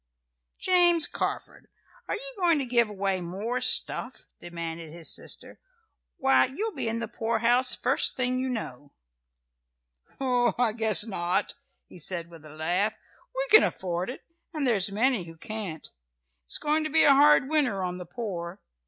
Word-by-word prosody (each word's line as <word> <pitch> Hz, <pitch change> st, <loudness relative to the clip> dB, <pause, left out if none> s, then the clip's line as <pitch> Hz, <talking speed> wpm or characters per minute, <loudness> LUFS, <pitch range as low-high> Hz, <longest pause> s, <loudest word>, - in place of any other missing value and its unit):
"James 350 Hz, -3 st, +4 dB
Carford, -, -, -5 dB, 0.4 s
are -, -, -2 dB
you -, -, -7 dB
going 345 Hz, -4 st, +2 dB
to 275 Hz, -, -2 dB
give 235 Hz, -2 st, +2 dB
away 195 Hz, -2 st, -2 dB
more 200 Hz, +8 st, -4 dB
stuff?" -, -, +2 dB
demanded 165 Hz, -2 st, -7 dB
his 165 Hz, 0 st, -3 dB
sister. -, -, -4 dB, 0.6 s
"Why, 270 Hz, 0 st, +3 dB
you'll 415 Hz, -, -4 dB
be -, -, -2 dB
in 225 Hz, -, -3 dB
the 230 Hz, -1 st, -4 dB
poorhouse 235 Hz, +3 st, +1 dB
first -, -, +1 dB
thing 255 Hz, 0 st, 0 dB
you 260 Hz, 0 st, -2 dB
know." 145 Hz, -, -6 dB, 1.3 s
"Oh, 250 Hz, -3 st, +1 dB
I 245 Hz, -2 st, +2 dB
guess 220 Hz, -1 st, +4 dB
not," 190 Hz, -2 st, -1 dB, 0.3 s
he -, -, -14 dB
said 170 Hz, +1 st, -5 dB
with 165 Hz, -3 st, -13 dB
a -, -, -12 dB
laugh, 175 Hz, +7 st, 0 dB, 0.4 s
"We -, -, -1 dB
can 435 Hz, -, +10 dB
afford 180 Hz, +1 st, -2 dB
it, 250 Hz, -, -8 dB, 0.3 s
and 300 Hz, -2 st, -1 dB
there's 205 Hz, -6 st, +2 dB
many 225 Hz, -2 st, +1 dB
who 165 Hz, -1 st, -12 dB
can't. 195 Hz, -5 st, -6 dB, 0.6 s
It's -, -, -2 dB
going 305 Hz, +1 st, 0 dB
to 310 Hz, -, -3 dB
be 320 Hz, +2 st, +4 dB
a 285 Hz, -, +6 dB
hard 285 Hz, -1 st, +5 dB
winter 275 Hz, -11 st, 0 dB
on 180 Hz, 0 st, -4 dB
the 180 Hz, -, -9 dB
poor. 175 Hz, -3 st, -6 dB
225 Hz, 160 wpm, -26 LUFS, 175-265 Hz, 1.3 s, can